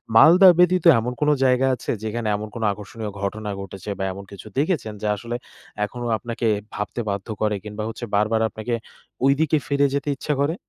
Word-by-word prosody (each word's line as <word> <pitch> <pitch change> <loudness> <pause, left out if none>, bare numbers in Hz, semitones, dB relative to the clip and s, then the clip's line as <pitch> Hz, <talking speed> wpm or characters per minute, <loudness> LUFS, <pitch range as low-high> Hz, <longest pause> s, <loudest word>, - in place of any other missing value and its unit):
মালদা 170 - +8
ব্যতীত 180 0 +4
এমন 125 +2 -3
কোন 150 - +3 0.2
জায়গা 130 +1 +3
আছে 120 - -4
যেখানে 110 +1 -3
এমন 105 +1 -4
কোনো 115 -2 -2
আকর্ষণীয় 105 +1 -6
ঘটনা 105 +1 -3
ঘটেছে? 95 +1 -8
বা - - -1
এমন 100 +1 -8
কিছু 100 - -10
দেখেছেন 145 - 0
যে 105 - -1
আসলে 120 +3 -5 0.5
এখনো 120 +3 -7
আপনাকে 115 0 -3 0.3
ভাবতে 105 +3 -3
বাধ্য 100 +1 -3
করে 105 -1 +2
কিংবা 105 0 -5
হচ্ছে 120 +2 -6
বারবার 110 +2 +2
আপনাকে 115 +2 -4 0.5
ওইদিকে 150 +3 +3
ফিরে 140 0 +2
যেতে 140 +1 -1
ইচ্ছা 150 - -1
করে? 155 +4 +1
115 Hz, 180 wpm, -23 LUFS, 105-140 Hz, 0.5 s, মালদা